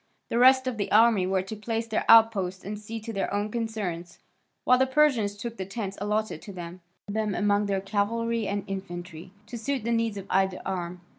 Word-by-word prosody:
The 235 - 0
rest 260 +1 +6
of 255 -3 -2
the 205 - -3
army 215 -4 +5
were 190 0 +1
to 195 +3 -7
place 225 +2 -3
their 220 -1 -2
outposts 200 -5 +5
and 205 +1 -5
see 225 +2 -6
to 225 +1 -6
their 195 - -2
own 205 +1 -1
concerns, 205 -7 -4 0.5
while 250 0 +4
the 265 - +3
Persians 260 -8 +2
took 230 +2 -6
the 190 - -4
tents 195 -1 -5
allotted 210 -4 -1
to 205 - -9
them, 175 -1 -8 0.2
and 205 - -6
divided 215 -1 -1
them - - -3
among 205 0 +2
their 195 -1 0
cavalry 220 +3 -1
and 200 0 -2
infantry, 180 -3 -7 0.2
to 230 +2 -7
suit 265 +1 -2
the 235 - -1
needs 230 -2 0
of 195 - -6
either 190 0 +1
arm. 180 -2 -4
210 Hz, 215 wpm, -27 LUFS, 190-230 Hz, 0.5 s, rest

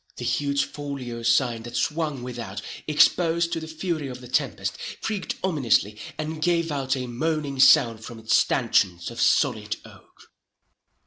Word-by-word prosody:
The - - -5
huge 140 -1 +1
folio 135 -5 -6
sign 115 0 +2
that 120 +1 -6
swung 150 -5 -1
without, 115 -5 -6 0.3
exposed 165 +2 +3
to - - -1
the 160 - -7
fury 160 -2 -3
of 125 -1 -7
the 125 - -11
tempest, 125 -8 -1 0.3
creaked 210 -4 -2
ominously, 120 - +1 0.2
and 155 0 -4
gave 170 -1 +1
out 135 -1 -1
a 130 - -3
moaning 140 +2 -2
sound 115 -4 +6
from 120 0 -8
its 110 0 +1
stanchions 85 -3 +2
of - - -5
solid - - +2
oak. - - -18
135 Hz, 150 wpm, -25 LUFS, 120-160 Hz, 0.3 s, sound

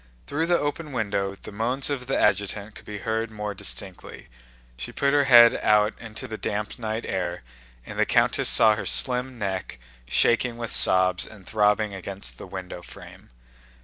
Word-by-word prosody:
Through 160 +3 -2
the 175 0 +3
open 145 0 -4
window 100 -4 -2
the - - -11
moans 125 +7 -1
of 125 -3 -4
the 135 - 0
adjutant 100 +1 0
could - - -15
be 105 - -6
heard 110 0 -1
more 105 -1 -5
distinctly. 95 -1 -4 0.5
She - - -6
put 140 0 0
her 145 -1 +4
head 120 -3 +8
out 105 0 +3
into 110 -2 -8
the 110 0 -7
damp 105 +3 -4
night 110 0 -3
air, 90 -3 -3 0.4
and - - -7
the - - +4
countess - - +3
saw 110 -1 +6
her 105 - -5
slim 125 0 +1
neck 95 - -4 0.3
shaking 120 - +2
with 115 -1 -4
sobs 95 0 +3
and 100 -4 -14
throbbing 105 0 +1
against 95 -10 -7
the - - -9
window 90 -2 -7
frame. - - -14
105 Hz, 175 wpm, -25 LUFS, 100-120 Hz, 0.5 s, head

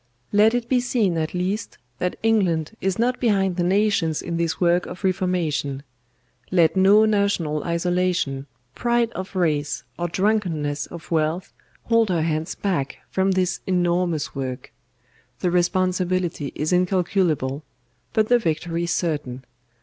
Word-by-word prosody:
"Let 215 +3 +4
it 240 -1 -1
be 255 0 +3
seen 235 -7 +1
at 155 +2 -3
least 190 +4 -2 0.2
that 180 - -1
England 190 -6 +1
is 190 -1 0
not 245 +2 +1
behind 195 -6 +2
the 175 - 0
nations 190 -4 +2
in 170 -1 -3
this 170 -1 -1
work 175 0 +2
of 180 - -9
reformation; 170 -7 -1 0.7
let 170 -2 +3
no 200 +3 +6
national 200 -8 +1
isolation, 175 -5 0 0.3
pride 235 - +1
of 190 +1 -7
race, 150 -5 0 0.2
or 175 - 0
drunkenness 170 -7 0
of 170 -1 -11
wealth 160 +2 0 0.3
hold 230 -2 +3
her 170 -3 +1
hands 155 0 -2
back 170 -9 -2
from 190 +1 +1
this 185 -1 0
enormous 175 -3 0
work. 130 -2 -5 0.7
The 180 - +1
responsibility 180 -3 0
is 155 +4 -1
incalculable, 180 -6 +1 0.5
but 220 -1 +2
the 245 +1 +4
victory 170 -2 -1
certain. 145 -7 -2
180 Hz, 135 wpm, -23 LUFS, 160-195 Hz, 0.7 s, no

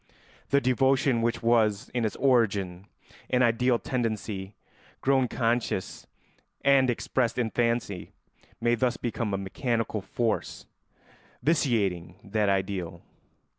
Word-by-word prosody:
The 140 - +4
devotion 130 -1 +2
which 115 0 -1
was, 110 -3 +2
in 120 -2 -1
its 110 - -2
origin, 100 -8 +1 0.4
an 125 0 +3
ideal 120 +1 +3
tendency 110 -6 -3 0.4
grown 135 -1 +2
conscious 115 -5 -1 0.6
and 135 -2 +5
expressed 120 0 0
in 115 -3 0
fancy 115 -6 -1 0.5
may 120 0 +2
thus 125 +1 +1
become 115 -2 -3
a 95 - 0
mechanical 110 +2 -2
force 115 +4 -2 0.8
vitiating 105 - +1
that 105 0 0
ideal. 95 -3 -2
115 Hz, 110 wpm, -27 LUFS, 100-125 Hz, 0.8 s, and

